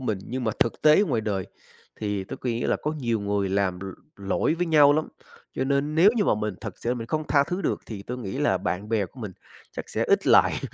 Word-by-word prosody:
mình. 110 Hz, -6 st, -2 dB
Nhưng 130 Hz, 0 st, -4 dB
mà 110 Hz, -, 0 dB
thực 115 Hz, -, 0 dB
tế 155 Hz, +5 st, +6 dB
ngoài 140 Hz, -, 0 dB
đời, 100 Hz, -4 st, -2 dB, 0.5 s
thì 105 Hz, -3 st, -2 dB
tôi -, -, -7 dB
quý 120 Hz, -2 st, -3 dB
là -, -, +1 dB
có 150 Hz, -, -1 dB
nhiều 120 Hz, -7 st, -2 dB
người 100 Hz, -1 st, -1 dB
làm 95 Hz, -2 st, 0 dB
l -, -, -6 dB, 0.3 s
lỗi 100 Hz, +10 st, 0 dB
với 175 Hz, +1 st, -1 dB
nhau 150 Hz, -3 st, +6 dB
lắm, 155 Hz, +1 st, 0 dB, 0.5 s
cho 130 Hz, -, -1 dB
nên 140 Hz, +2 st, 0 dB
nếu 180 Hz, +6 st, +6 dB
như 210 Hz, -, +2 dB
mà -, -, +3 dB
mình 105 Hz, -1 st, -3 dB
thật 105 Hz, -3 st, -7 dB
sự 120 Hz, -, -2 dB
là -, -, +1 dB
mình 115 Hz, -2 st, -6 dB
không 155 Hz, +5 st, -2 dB
tha 140 Hz, -1 st, +4 dB
thứ 180 Hz, +2 st, -3 dB
được -, -, -1 dB
thì 105 Hz, -3 st, -7 dB
tôi 125 Hz, +5 st, -6 dB
nghĩ 100 Hz, -6 st, -5 dB
là -, -, +2 dB
bạn 100 Hz, +4 st, -3 dB
bè 110 Hz, -3 st, 0 dB
của 125 Hz, -, -15 dB
mình, 105 Hz, -4 st, -6 dB, 0.4 s
chắc -, -, -7 dB
sẽ -, -, -1 dB
ít -, -, +2 dB
lại, -, -, +5 dB
115 Hz, 255 wpm, -25 LUFS, 100-145 Hz, 0.5 s, tế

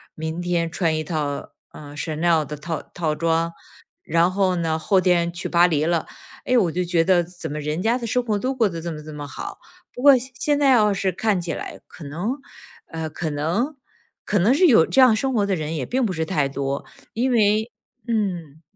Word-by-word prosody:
明 160 Hz, +2 st, -4 dB
天 175 Hz, -1 st, 0 dB
穿 165 Hz, -2 st, 0 dB
一 155 Hz, -, -2 dB
套， 150 Hz, -3 st, -3 dB, 0.2 s
呃 145 Hz, -1 st, -11 dB
，Chanel 160 Hz, +2 st, +1 dB
的 150 Hz, -, -6 dB
套 160 Hz, +2 st, -4 dB
套 160 Hz, -3 st, -3 dB
装， 165 Hz, +1 st, 0 dB, 0.5 s
然 170 Hz, +3 st, +2 dB
后 190 Hz, -1 st, +1 dB
呢， 165 Hz, -2 st, 0 dB
后 190 Hz, +4 st, +2 dB
天 175 Hz, -2 st, +2 dB
去 180 Hz, -, -4 dB
巴 175 Hz, 0 st, +5 dB
黎 155 Hz, -4 st, +1 dB
了。 170 Hz, -1 st, 0 dB, 0.4 s
哎， 255 Hz, -, +3 dB
我 185 Hz, -8 st, +3 dB
就 180 Hz, +3 st, -1 dB
觉 170 Hz, -1 st, +2 dB
得 175 Hz, 0 st, +3 dB
怎 175 Hz, -3 st, -8 dB
么 150 Hz, -, -4 dB
人 150 Hz, +2 st, -3 dB
家 230 Hz, +2 st, +2 dB
的 235 Hz, -, -4 dB
生 250 Hz, +3 st, +1 dB
活 210 Hz, -3 st, 0 dB
都 260 Hz, +5 st, -2 dB
过 235 Hz, -4 st, +3 dB
得 170 Hz, -4 st, -5 dB
这 170 Hz, +1 st, -4 dB
么 150 Hz, -1 st, -7 dB
这 155 Hz, 0 st, -9 dB
么 145 Hz, -1 st, -6 dB
好。 135 Hz, -, -7 dB, 0.3 s
不 245 Hz, -, -7 dB
过 280 Hz, -1 st, +8 dB
现 255 Hz, +2 st, -7 dB
现 290 Hz, +2 st, +1 dB
在 280 Hz, -2 st, +4 dB
要 215 Hz, -4 st, +5 dB
是 195 Hz, -1 st, 0 dB
看 205 Hz, +1 st, 0 dB
起 170 Hz, -2 st, -3 dB
来， -, -, -7 dB
可 -, -, -13 dB
能 165 Hz, +10 st, -3 dB, 0.6 s
呃， 160 Hz, -1 st, -4 dB
可 160 Hz, +1 st, -3 dB
能 170 Hz, -, -1 dB, 0.5 s
可 205 Hz, -, +1 dB
能 200 Hz, +7 st, +4 dB
是 350 Hz, +7 st, +4 dB
有 220 Hz, -, +6 dB
这 -, -, +1 dB
样 255 Hz, -4 st, +7 dB
生 265 Hz, +4 st, -1 dB
活 205 Hz, -3 st, +2 dB
的 200 Hz, -1 st, 0 dB
人 155 Hz, -1 st, -3 dB
也 140 Hz, -5 st, -2 dB
并 260 Hz, +1 st, 0 dB
不 -, -, -3 dB
是 160 Hz, -2 st, -2 dB
太 150 Hz, -6 st, 0 dB
多， 140 Hz, 0 st, -3 dB, 0.3 s
因 250 Hz, +3 st, 0 dB
为 215 Hz, 0 st, +2 dB, 0.4 s
嗯。 175 Hz, -9 st, -2 dB
175 Hz, 255 characters per minute, -22 LUFS, 160-215 Hz, 0.6 s, 过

